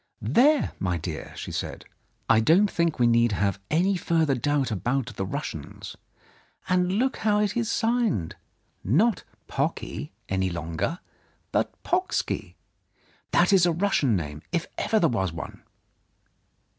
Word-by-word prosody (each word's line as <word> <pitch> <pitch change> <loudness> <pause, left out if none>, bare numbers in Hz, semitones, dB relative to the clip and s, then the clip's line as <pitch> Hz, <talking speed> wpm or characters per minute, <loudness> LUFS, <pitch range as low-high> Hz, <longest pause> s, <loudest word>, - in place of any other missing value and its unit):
"There, 290 - +4
my 90 -2 0
dear," 80 -1 -6
she - - -6
said, - - -5 0.4
"I 115 - +5
don't 175 - +4
think 170 -2 +1
we 120 - +3
need 115 -1 +4
have 100 -1 0
any 185 +5 +2
further 165 -4 +1
doubt 135 -1 0
about 125 +4 -1
the 95 - -3
Russians. - - -6 0.7
And 180 0 +2
look 255 +6 +1
how 210 -1 +2
it 210 -1 0
is 235 -2 0
signed 225 - 0 0.3
— - - -43 0.2
not 230 -1 +2 0.2
Pocky - - -3 0.2
any 95 -1 0
longer, 85 - -3 0.5
but - - +1
Pocksky. 370 +1 -1 0.7
That - - +3
is 180 -2 +6
a - - +3
Russian 165 - +2
name, 75 -4 -4
if 170 -1 0
ever 220 - +1
there 165 - +4
was 95 - 0
one 80 - -8
155 Hz, 145 wpm, -26 LUFS, -, 0.7 s, is